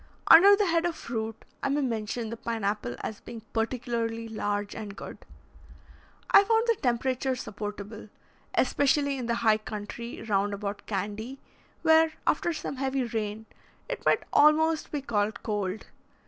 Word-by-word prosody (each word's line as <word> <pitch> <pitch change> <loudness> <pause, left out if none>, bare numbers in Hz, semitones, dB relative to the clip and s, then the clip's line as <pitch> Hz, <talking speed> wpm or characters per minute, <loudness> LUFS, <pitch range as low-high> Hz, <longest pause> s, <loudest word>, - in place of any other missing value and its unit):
Under 400 +4 +9
the 410 0 +1
head 335 -2 +2
of 340 - -3
fruit, 225 -4 -5 0.2
I - - 0
may 290 +2 +1
mention 230 -2 -2
the - - -3
pine 230 -1 -4
apple 200 - -1
as 215 - -5
being 230 - -9
particularly 230 -1 -2
large 205 -2 -2
and 210 -2 -7
good. - - -9 1.1
I - - +8
found 450 +2 +3
the 465 -1 +3
temperature 255 +1 0
supportable, 210 -2 -7 0.5
especially 280 +1 +2
in 245 - -4
the 235 - +1
high 215 -1 +5
country 215 +2 -7
round 205 -1 0
about 200 0 -5
Candy, 215 +6 -4 0.4
where, 320 0 +5
after 345 - +1
some 305 -4 -5
heavy 265 0 0
rain, 220 -2 -3 0.4
it - - -5
might - - +3
almost 310 +1 +4
be 290 -3 -3
called 215 -2 -1
cold. 205 -2 -2
230 Hz, 150 wpm, -28 LUFS, 210-275 Hz, 1.1 s, Under